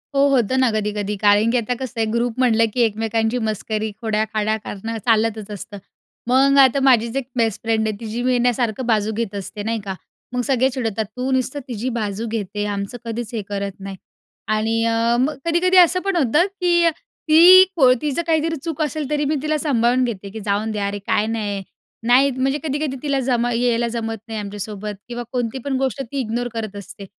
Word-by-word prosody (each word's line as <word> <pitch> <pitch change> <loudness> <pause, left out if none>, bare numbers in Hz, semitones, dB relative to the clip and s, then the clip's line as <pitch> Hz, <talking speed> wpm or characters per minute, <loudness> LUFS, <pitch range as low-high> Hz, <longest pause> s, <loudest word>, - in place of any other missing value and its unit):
हो, 275 +1 +4
होतं 260 -2 +2
ना 260 -2 +4
कधी-कधी 210 -1 -2
कारण 205 +2 +4
की 250 - +2
आता 235 +1 -1
कसं 245 -3 -5
आहे 225 - +2
ग्रुप 235 +1 -1
म्हटलं 230 -3 +4
की 245 - +1
एकमेकांची 225 +1 0
मस्करी, 215 0 -3
खोड्या-खाड्या 215 -1 0
करणं 225 +3 -5
चालतच 220 -2 +1
असतं, 205 0 -8 0.5
मग 270 +3 +4
आता 270 0 +5
माझीच 235 -3 +3
एक 270 -3 -3
बेस्ट 225 -2 0
फ्रेंड 220 -1 0
आहे, 215 - -2
तिची 230 +1 -4
मी 250 0 +2
ना 245 +1 +3
सारखं 240 +1 -2
बाजू 220 -2 +1
घेत 215 -2 -3
असते 200 +1 -6
नाही 225 +1 -1
का, 195 -1 -4 0.4
मग 250 - 0
सगळे 260 -1 +2
चिडवतात 225 -5 -2
तू 255 +1 -2
नुसतं 260 +2 0
तिची 240 0 -3
बाजू 210 +1 -3
घेते 210 -2 -3
आमचं 200 +4 -4
कधीच 230 0 -5
हे 225 - -2
करत 200 -1 -3
नाही 195 0 -7 0.6
आणि 225 +1 0
अ, 230 +1 +2
मग 275 +4 +1
कधी-कधी 350 +3 +2
असं 360 0 +6
पण 390 -1 0
होतं 300 +2 +3 0.2
की 345 -1 +4 0.4
ती 355 +4 +9
को 260 -6 +6
तिचं 300 +1 -1
काहीतरी 325 0 +1
चूक 325 -2 -4
असेल 300 -1 -2
तरी 295 -1 0
मी 300 +2 0
तिला 305 +1 0
सांभाळून 255 -4 +2
घेते 205 -5 -4
की 220 +3 -8
जाऊन 210 +2 0
दे 215 - -4
यार, 200 - -1
अरे 205 0 -4
काय 210 - +2
नाही 205 -3 -3 0.4
नाही, 260 +3 +5
म्हणजे 265 +2 0
कधी-कधी 295 -2 -2
तिला 280 -2 0
जमा 245 -2 +1
यायला 235 0 +1
जमत 225 -1 -3
नाही 220 -1 -4
आमच्यासोबत 205 0 -5
किंवा 240 0 -5
कोणती 245 -1 -2
पण 280 -1 -1
गोष्ट 265 +1 -1
ती 270 +2 -5
इग्नोर 240 0 -2
करत 215 -3 -5
असते, 200 0 -9
230 Hz, 200 wpm, -21 LUFS, 215-265 Hz, 0.6 s, ती